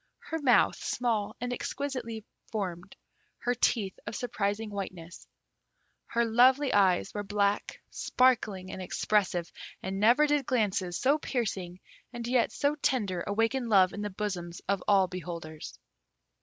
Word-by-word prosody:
Her 325 - -1
mouth 255 -4 +4
small 230 -4 -1
and 245 0 -3
exquisitely 245 -5 -4 0.3
formed, 185 -4 -4 0.4
her 245 - 0
teeth 225 -5 0
of 210 - -4
surprising 210 -2 -2
whiteness. 185 -4 -7 0.8
Her 235 0 +1
lovely 255 +5 +4
eyes 190 -3 +3
were 205 - -2
black, 205 0 0
sparkling, 215 -7 +1
and 190 - -6
expressive, 180 -1 0 0.3
and 190 +1 -3
never 240 +8 +5
did 295 -3 +1
glances 195 -7 0
so 285 +4 +2
piercing 190 -10 -3 0.3
and 240 -1 -6
yet 245 0 +2
so 285 +1 +1
tender 210 - -1
awaken 225 +4 0
love 190 -3 +5
in 205 - -5
the 210 - -2
bosoms 185 -4 -4
of 200 -1 0
all 200 -2 +5
beholders. 170 -3 -7
210 Hz, 135 wpm, -29 LUFS, 185-245 Hz, 0.8 s, never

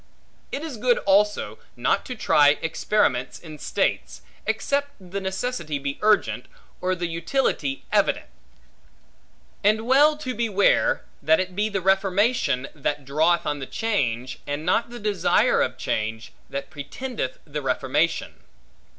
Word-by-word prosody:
It 280 - -4
is 305 -7 -5
good 245 +2 +3
also, 205 +1 +2 0.2
not - - +1
to 250 - -4
try 145 -9 +4
experiments 160 -6 0
in 155 -3 -11
states, - - -1 0.2
except 285 0 0
the 190 +1 -6
necessity 190 - -2
be 140 0 -4
urgent, 215 0 +2 0.3
or 185 0 +1
the 175 0 -3
utility 165 - -1
evident; - - +2 1.4
and 215 +2 +3
well 290 +4 +5
to 255 -4 -4
beware, 215 -5 +2 0.2
that 155 +2 +4
it 185 -1 -3
be 210 +2 +1
the 200 -2 -2
reformation, 190 - +2
that 145 -1 -3
draweth 160 +5 +2
on 145 -1 -1
the 135 - -6
change, 130 - -1
and 145 +2 -3
not 225 +7 +2
the 240 - -8
desire 210 -4 +2
of - - -1
change, 110 +1 -3 0.2
that 140 0 -5
pretendeth 155 - -5
the 150 0 -4
reformation. 140 +4 0
185 Hz, 135 wpm, -24 LUFS, 145-215 Hz, 1.4 s, well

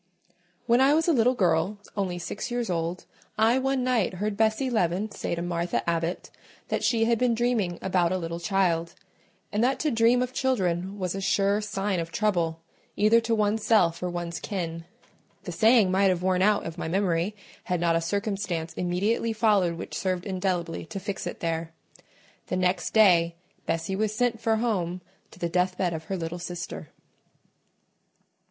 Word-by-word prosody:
When 235 +2 +4
I 275 +3 +5
was 320 +1 +1
a 335 - +4
little 250 0 +3
girl, 180 0 +1 0.2
only 190 -3 -2
six 175 - -5
years 240 -4 -2
old, 170 +1 -2 0.3
I 230 +4 +4
one 265 -1 0
night 240 -7 +1
heard 205 +3 -2
Bessie 220 +5 +1
Leaven 200 0 0
say - - -3
to 170 - -4
Martha 170 0 -2
Abbot 170 +1 -2 0.4
that - - -1
she 230 -2 +2
had 230 -1 +2
been 245 -2 +2
dreaming 225 -7 0
about 180 -2 +2
a 185 - +1
little 170 -1 -4
child; 170 -3 0 0.6
and 210 +2 +1
that 260 +2 +2
to 305 - +1
dream 230 +2 +4
of 250 0 -5
children 190 -7 0
was 185 -3 -2
a 195 - -4
sure 200 +2 +2
sign 205 -2 -2
of 165 0 -4
trouble, 170 -6 0 0.3
either 215 +3 +4
to 230 0 0
one's 210 0 +1
self 175 -7 +3
or 180 - -1
one's 175 -1 -4
kin. 165 -5 -4 0.6
The - - -5
saying 220 -4 +4
might 195 +1 +4
have 180 -1 0
worn 185 0 +2
out 205 +1 +3
of 165 +1 -6
my - - -3
memory, 180 +2 0 0.3
had 180 -1 -1
not 170 -1 +2
a 165 - +1
circumstance 195 -3 -2
immediately 200 +6 0
followed 205 -6 +2
which - - -7
served 185 -1 -2
indelibly 180 -3 -2
to 200 - -5
fix 200 0 -4
it - - -7
there. 165 -1 -2 0.7
The 185 - -1
next 180 +1 0
day 170 -6 +5 0.3
Bessie 165 +3 -1
was 215 +1 -1
sent 235 -1 0
for 225 -1 +2
home 185 -6 -1 0.3
to - - -16
the 170 - -2
deathbed 180 0 0
of 160 0 -6
her 190 +3 -3
little 170 +1 -4
sister. 175 -4 -6
190 Hz, 180 wpm, -26 LUFS, 170-220 Hz, 0.7 s, I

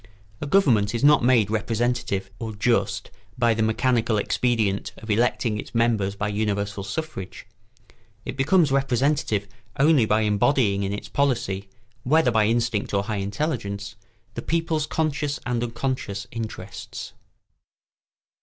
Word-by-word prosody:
A 145 - -3
government 120 - +3
is 115 - -2
not 150 -2 +6
made 120 -5 +4
representative 110 -3 -1
or 110 -2 -5
just 100 -3 0 0.3
by 120 -2 +3
the 110 - -1
mechanical 115 0 +1
expedient 105 -2 0
of 110 - -6
electing 115 0 +1
its - - -9
members 110 -4 +1
by 100 +1 -2
universal 100 -1 -2
suffrage. 95 -3 -6 0.8
It - - -5
becomes 150 +3 +3
representative 135 -5 +1 0.3
only 140 -5 +5
by 105 +1 +3
embodying 105 0 +2
in 100 0 -1
its 105 +1 -5
policy, 105 -6 -1 0.3
whether 135 +1 +3
by 110 -2 +3
instinct 115 -3 0
or 100 - +2
high 110 0 -3
intelligence, 100 -1 -3 0.4
the 120 - -5
people's 160 -1 -1
conscious 150 -2 -1
and 125 -1 -1
unconscious 115 -4 -3
interests. 115 -1 -7
115 Hz, 130 wpm, -24 LUFS, 100-130 Hz, 0.8 s, not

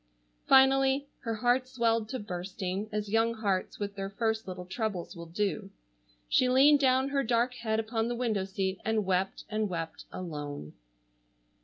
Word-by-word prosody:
Finally,—her 270 -2 +3
heart 245 +3 +2
swelled 230 -3 0
to 260 - -3
bursting, 190 0 -4
as 210 -1 -2
young 225 +1 +2
hearts 200 -4 -1
with 200 -1 -4
their 195 -1 -4
first 220 +1 -1
little 180 -1 -6
troubles 195 -2 -3
will 170 0 -8
do,—she - - -2
leaned 280 +3 +6
down 265 0 +3
her 280 0 +1
dark 240 0 +1
head 220 -3 -1
upon 225 0 -1
the 240 - -2
window 225 -5 0
seat 190 0 -2
and 220 -1 0
wept 190 0 0
and 215 -1 -1
wept, 165 -2 -5
alone. 145 - -6
215 Hz, 150 wpm, -30 LUFS, 185-240 Hz, -, leaned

